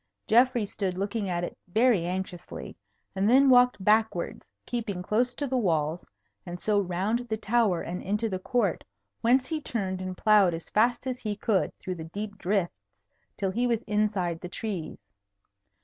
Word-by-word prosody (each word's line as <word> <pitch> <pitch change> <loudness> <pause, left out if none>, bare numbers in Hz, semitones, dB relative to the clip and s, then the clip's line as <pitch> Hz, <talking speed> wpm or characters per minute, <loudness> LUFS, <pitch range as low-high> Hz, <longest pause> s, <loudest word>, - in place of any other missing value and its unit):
Geoffrey 240 -1 +4
stood 190 -2 -3
looking 200 +1 -2
at 175 -1 -1
it - - -4
very 215 -2 +3
anxiously, 180 -1 -5 0.4
and 195 +2 +2
then 265 +2 +6
walked 245 -5 +4
backwards, 215 - +1 0.2
keeping 215 -7 -3
close 245 +6 0
to 290 - -2
the 260 -1 0
walls, 160 -5 0 0.4
and 175 0 -7
so 210 +1 +2
round 195 +5 0
the 220 - -1
tower 215 -4 +1
and 180 +2 -5
into 210 +4 -1
the 190 -3 -3
court, 245 +6 0 0.4
whence 255 +2 +3
he 315 -1 -2
turned 190 -8 -3
and 185 -1 -5
ploughed 205 -5 +4
as 165 - -9
fast 240 +4 +2
as 255 -1 -3
he 210 -2 -3
could 205 -1 +1
through 185 - -5
the 165 -3 -7
deep 205 +4 -6
drifts 175 - -2 0.5
till 195 -2 -1
he 240 +5 0
was 235 -1 0
inside 205 -5 0
the 180 - -6
trees. 190 -4 -4
205 Hz, 170 wpm, -27 LUFS, 180-235 Hz, 0.5 s, then